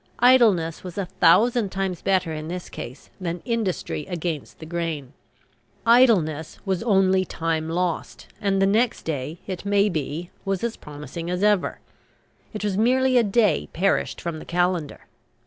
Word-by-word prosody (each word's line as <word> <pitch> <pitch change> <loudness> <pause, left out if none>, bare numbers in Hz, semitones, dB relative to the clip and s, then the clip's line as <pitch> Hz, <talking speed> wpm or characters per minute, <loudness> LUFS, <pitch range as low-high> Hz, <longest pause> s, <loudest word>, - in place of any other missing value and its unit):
Idleness 220 -10 +4
was 180 0 -8
a 200 - -1
thousand 205 +5 +3
times 190 -2 -2
better 185 -4 +1
in 155 0 -5
this 180 +1 -6
case 130 +4 -9
than 175 -1 -4
industry 220 -10 -2
against 170 -4 -4
the 160 - -10
grain. 160 -5 -4 0.7
Idleness 200 - +4
was 190 -2 0
only 190 -4 +3
time 160 -2 -2
lost; 175 0 -2 0.2
and 195 -2 +1
the 195 - +4
next 220 +5 +1
day, 150 +1 -4
it 185 -3 -5
may 200 +1 +3
be, 160 +1 -4
was 195 0 -2
as 235 -1 -1
promising 150 +3 -8
as 180 +2 -1
ever. 210 -3 +2 0.7
It 210 - -6
was 205 -1 0
merely 255 +3 +3
a - - +3
day 205 -5 +2
perished 195 +4 0
from 170 -2 -4
the - - -10
calendar. 175 -3 -1
180 Hz, 155 wpm, -24 LUFS, 165-205 Hz, 0.7 s, Idleness